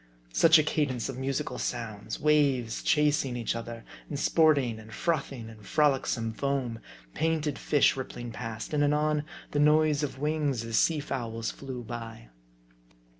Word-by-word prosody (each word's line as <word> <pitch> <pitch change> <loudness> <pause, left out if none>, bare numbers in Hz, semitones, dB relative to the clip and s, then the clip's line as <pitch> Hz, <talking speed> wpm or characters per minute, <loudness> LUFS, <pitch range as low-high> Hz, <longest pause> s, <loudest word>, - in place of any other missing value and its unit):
Such 165 - +7
a 155 - +4
cadence 145 -6 -1
of 130 -1 -5
musical 130 -2 -2
sounds! 110 -3 -4
Waves 140 -7 +2
chasing 145 -4 +2
each 115 -1 -2
other, 115 0 -7 0.2
and 145 - -3
sporting 145 -9 +3
and 110 0 -12
frothing 140 -8 -2
in 110 -1 -12
frolicsome 130 -4 +1
foam: 130 -3 -2 0.3
painted 160 -3 0
fish 145 - +3
rippling 120 -2 -6
past; 115 +3 -6
and 145 -1 +2
anon 150 +1 +2 0.3
the 145 - 0
noise 150 0 +4
of 145 -3 -3
wings 145 -5 -1
as 115 -1 +1
sea 160 -3 +2
fowls 115 -5 -3
flew 130 -3 -7
by. 115 - -8
135 Hz, 145 wpm, -28 LUFS, 115-150 Hz, 0.3 s, Such